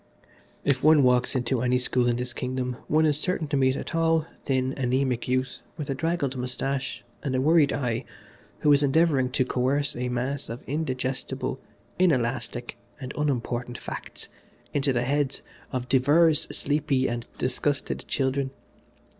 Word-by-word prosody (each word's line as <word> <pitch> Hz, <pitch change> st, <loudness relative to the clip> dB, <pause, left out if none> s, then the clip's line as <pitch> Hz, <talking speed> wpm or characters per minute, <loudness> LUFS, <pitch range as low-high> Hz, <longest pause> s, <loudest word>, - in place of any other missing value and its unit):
"If 135 Hz, -3 st, +2 dB
one 155 Hz, -1 st, +7 dB
walks 125 Hz, +1 st, +3 dB
into 125 Hz, -1 st, 0 dB
any 125 Hz, 0 st, +2 dB
school 125 Hz, -1 st, +1 dB
in 120 Hz, -, +2 dB
this 125 Hz, 0 st, -4 dB
kingdom 125 Hz, 0 st, -3 dB
one 155 Hz, +1 st, +3 dB
is 150 Hz, -1 st, +2 dB
certain 170 Hz, -2 st, -1 dB
to -, -, 0 dB
meet 130 Hz, -1 st, +3 dB
a -, -, -3 dB
tall, 165 Hz, -1 st, +1 dB, 0.2 s
thin, 130 Hz, -1 st, +1 dB
anaemic 130 Hz, -1 st, 0 dB
youth 130 Hz, +1 st, 0 dB, 0.2 s
with 150 Hz, -3 st, -3 dB
a -, -, +1 dB
draggled 150 Hz, -2 st, -1 dB
moustache 130 Hz, +2 st, -2 dB, 0.2 s
and 135 Hz, -3 st, -2 dB
a -, -, +2 dB
worried 150 Hz, 0 st, +4 dB
eye 120 Hz, -4 st, -1 dB, 0.6 s
who 150 Hz, -, +5 dB
is 140 Hz, -, +5 dB
endeavouring 145 Hz, -2 st, +3 dB
to 130 Hz, -, +2 dB
coerce 130 Hz, +3 st, +1 dB
a 125 Hz, 0 st, -2 dB
mass 130 Hz, +3 st, -2 dB
of 115 Hz, +1 st, -6 dB
indigestible, 130 Hz, -3 st, -2 dB, 0.4 s
inelastic 125 Hz, -6 st, 0 dB, 0.2 s
and 130 Hz, -1 st, -6 dB
unimportant 125 Hz, -4 st, -1 dB
facts -, -, -6 dB, 0.4 s
into 140 Hz, -1 st, +2 dB
the 120 Hz, -1 st, +1 dB
heads 140 Hz, +1 st, 0 dB, 0.3 s
of 125 Hz, -1 st, -3 dB
divers 150 Hz, +5 st, +4 dB
sleepy 145 Hz, -2 st, +1 dB
and 120 Hz, 0 st, -3 dB
disgusted 140 Hz, +2 st, -1 dB
children. 135 Hz, 0 st, 0 dB
130 Hz, 155 wpm, -26 LUFS, 125-145 Hz, 0.6 s, one